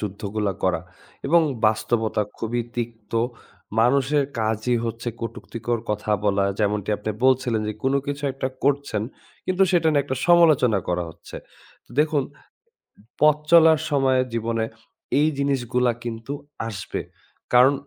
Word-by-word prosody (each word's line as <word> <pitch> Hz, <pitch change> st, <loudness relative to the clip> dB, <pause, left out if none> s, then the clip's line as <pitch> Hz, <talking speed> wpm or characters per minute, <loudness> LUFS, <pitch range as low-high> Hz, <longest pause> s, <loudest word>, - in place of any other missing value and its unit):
যুদ্ধগুলা 105 Hz, 0 st, -3 dB
করা 95 Hz, -3 st, +1 dB, 0.5 s
এবং 170 Hz, +4 st, +5 dB, 0.3 s
বাস্তবতা 110 Hz, 0 st, +1 dB, 0.2 s
খুবই 120 Hz, +1 st, -1 dB
তিক্ত। 115 Hz, -3 st, -5 dB, 0.7 s
মানুষের 140 Hz, +4 st, +3 dB
কাজই 110 Hz, +2 st, 0 dB
হচ্ছে 115 Hz, +1 st, -4 dB
কটুক্তিকর 115 Hz, 0 st, -4 dB
কথা 105 Hz, 0 st, -2 dB
বলা। 100 Hz, -1 st, +2 dB
যেমনটি 105 Hz, -1 st, 0 dB
আপনি 105 Hz, +1 st, -4 dB
বলছিলেন 125 Hz, -4 st, +3 dB
যে -, -, -1 dB
কোন 135 Hz, +1 st, +1 dB
কিছু 145 Hz, +1 st, -4 dB
একটা 130 Hz, 0 st, -3 dB, 0.2 s
করছেন 140 Hz, -6 st, +1 dB, 0.4 s
কিন্তু 185 Hz, +1 st, +2 dB
সেটা 170 Hz, -3 st, +3 dB
নিয়ে 145 Hz, -2 st, +3 dB
একটা 130 Hz, -1 st, -3 dB
সমালোচনা 155 Hz, -, +5 dB
করা 90 Hz, 0 st, 0 dB
হচ্ছে। -, -, -12 dB, 0.5 s
তো -, -, -27 dB
দেখুন, 150 Hz, -2 st, +2 dB, 1.0 s
পথ 150 Hz, 0 st, +6 dB
চলার 160 Hz, -2 st, +7 dB
সময়ে 135 Hz, -3 st, +3 dB
জীবনে 115 Hz, 0 st, -1 dB, 0.5 s
এই 150 Hz, -, +4 dB
জিনিসগুলা 125 Hz, -3 st, +1 dB
কিন্তু 115 Hz, +3 st, -5 dB, 0.3 s
আসবে। 100 Hz, -4 st, -5 dB, 0.5 s
কারণ 125 Hz, +3 st, +7 dB
120 Hz, 130 wpm, -23 LUFS, 110-140 Hz, 1.0 s, চলার